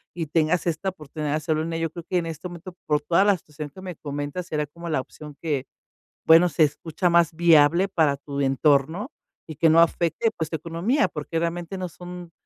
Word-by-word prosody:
y 165 Hz, -2 st, -3 dB
tengas 160 Hz, +3 st, +1 dB
esta 170 Hz, +4 st, -1 dB
oportunidad 150 Hz, -4 st, -5 dB
de 155 Hz, -, +1 dB
hacerlo 155 Hz, 0 st, -1 dB
en 165 Hz, +1 st, -4 dB
ello, 165 Hz, 0 st, -1 dB
yo -, -, -14 dB
creo 170 Hz, +1 st, -8 dB
que 180 Hz, -, 0 dB
en 165 Hz, -, -4 dB
este 165 Hz, +2 st, -6 dB
momento, 175 Hz, +1 st, -10 dB
por 150 Hz, 0 st, +1 dB
toda 170 Hz, +6 st, +3 dB
la 205 Hz, -1 st, +4 dB
situación 150 Hz, -2 st, -9 dB
que 185 Hz, -, -12 dB
me 180 Hz, -3 st, -7 dB
comentas, 145 Hz, +4 st, -5 dB
sería 150 Hz, -4 st, -2 dB
como 170 Hz, +3 st, -10 dB
la 155 Hz, -4 st, +1 dB
opción 150 Hz, +2 st, -12 dB
que, 145 Hz, -5 st, -1 dB, 0.6 s
bueno, 165 Hz, +2 st, +7 dB
se 155 Hz, -, +3 dB
escucha 160 Hz, +4 st, 0 dB
más 170 Hz, -1 st, +3 dB
viable 170 Hz, +2 st, +5 dB
para 155 Hz, -6 st, +2 dB
tu 140 Hz, 0 st, -6 dB
entorno 140 Hz, +6 st, +1 dB, 0.3 s
y 155 Hz, -3 st, -9 dB
que 165 Hz, 0 st, +4 dB
no 165 Hz, +1 st, +6 dB
afecte, 170 Hz, +6 st, +1 dB
pues, 160 Hz, -2 st, -2 dB
tu 160 Hz, -, -3 dB
economía, 170 Hz, -, 0 dB
porque 155 Hz, +2 st, -5 dB
realmente 170 Hz, +2 st, -3 dB
no 185 Hz, -1 st, -4 dB
son 175 Hz, +1 st, -10 dB
165 Hz, 215 wpm, -24 LUFS, 150-175 Hz, 0.6 s, bueno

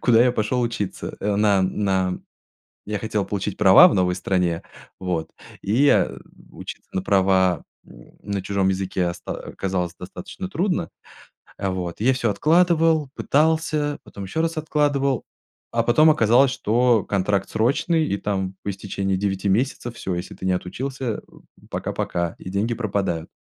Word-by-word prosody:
куда 120 Hz, -1 st, +5 dB
я 125 Hz, -, +4 dB
пошел 125 Hz, +3 st, 0 dB
учиться, 110 Hz, -5 st, -3 dB
э, 100 Hz, 0 st, 0 dB
на 100 Hz, -2 st, +3 dB
на 95 Hz, -1 st, 0 dB, 0.7 s
Я 105 Hz, -1 st, -3 dB
хотел 105 Hz, -2 st, -1 dB
получить 100 Hz, 0 st, -3 dB
права 95 Hz, -2 st, +8 dB
в -, -, +1 dB
новой 90 Hz, -1 st, +2 dB
стране, 90 Hz, -3 st, 0 dB, 0.4 s
вот 85 Hz, -4 st, -2 dB, 0.3 s
и, 120 Hz, +9 st, +2 dB
а, -, -, +3 dB, 0.4 s
учиться -, -, -9 dB
на 95 Hz, -, 0 dB
права 95 Hz, -2 st, +3 dB, 0.2 s
на 100 Hz, +11 st, -7 dB
чужом 100 Hz, -1 st, 0 dB
языке 95 Hz, -2 st, -1 dB
оста 85 Hz, -, -7 dB, 0.2 s
оказалось 90 Hz, -2 st, -3 dB
достаточно 90 Hz, -, -7 dB
трудно. 185 Hz, 0 st, -1 dB, 0.7 s
Э. 95 Hz, -, -2 dB
Вот 90 Hz, 0 st, -4 dB
я 130 Hz, +3 st, +4 dB
всё 120 Hz, -3 st, 0 dB
откладывал, 160 Hz, -, +3 dB
пытался, 155 Hz, -1 st, +1 dB
потом 100 Hz, -, -9 dB
еще 160 Hz, +12 st, -2 dB
раз 165 Hz, 0 st, -1 dB
откладывал, 145 Hz, -4 st, +1 dB, 0.5 s
а 115 Hz, -1 st, +1 dB
потом 155 Hz, +7 st, +5 dB
оказалось, 125 Hz, -1 st, +4 dB
что 120 Hz, -1 st, +2 dB
контракт 100 Hz, 0 st, 0 dB
срочный 155 Hz, +8 st, +1 dB
и 100 Hz, -, -1 dB
там 95 Hz, -2 st, -2 dB
по -, -, -3 dB
истечении 95 Hz, 0 st, -2 dB
9 95 Hz, 0 st, -1 dB
месяцев 120 Hz, +2 st, -1 dB
всё, 90 Hz, -2 st, -3 dB
если 90 Hz, +2 st, -6 dB
ты 95 Hz, -, -8 dB
не 95 Hz, -, +2 dB
отучился, 130 Hz, +9 st, -4 dB
э, -, -, -9 dB, 0.5 s
пока-пока 85 Hz, -1 st, -2 dB
и 90 Hz, -, -8 dB
деньги 105 Hz, +5 st, 0 dB
пропадают. 95 Hz, -7 st, -2 dB
100 Hz, 150 wpm, -23 LUFS, 95-130 Hz, 0.7 s, права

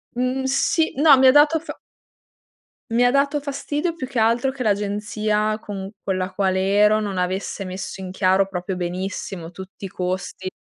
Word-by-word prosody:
Mhmm, 255 Hz, +2 st, -1 dB
sì, 275 Hz, +4 st, +1 dB
no, 290 Hz, 0 st, +7 dB
mi 265 Hz, -, +5 dB
ha -, -, +9 dB
dato 295 Hz, +4 st, +5 dB
fa 330 Hz, -, -9 dB, 1.1 s
mi 235 Hz, +2 st, +3 dB
ha 245 Hz, -, +5 dB
dato 280 Hz, +2 st, +1 dB
fastidio 290 Hz, +4 st, -3 dB
più 270 Hz, -6 st, -5 dB
che 260 Hz, -2 st, -5 dB
altro 230 Hz, +4 st, +2 dB
che 265 Hz, -1 st, -6 dB
l'agenzia 210 Hz, 0 st, 0 dB
con 195 Hz, -2 st, -6 dB
con 190 Hz, -, -1 dB
la 185 Hz, +1 st, -2 dB
quale 190 Hz, 0 st, 0 dB
ero 210 Hz, +1 st, +5 dB
non 200 Hz, -3 st, -3 dB
avesse 185 Hz, +2 st, -2 dB
messo 190 Hz, +1 st, -6 dB
in 185 Hz, -, -6 dB
chiaro 190 Hz, +1 st, +2 dB
proprio 185 Hz, 0 st, -4 dB
benissimo 180 Hz, -1 st, -4 dB
tutti 190 Hz, +2 st, -9 dB
i -, -, -6 dB
costi. 185 Hz, +1 st, -4 dB
210 Hz, 175 wpm, -22 LUFS, 190-265 Hz, 1.1 s, ha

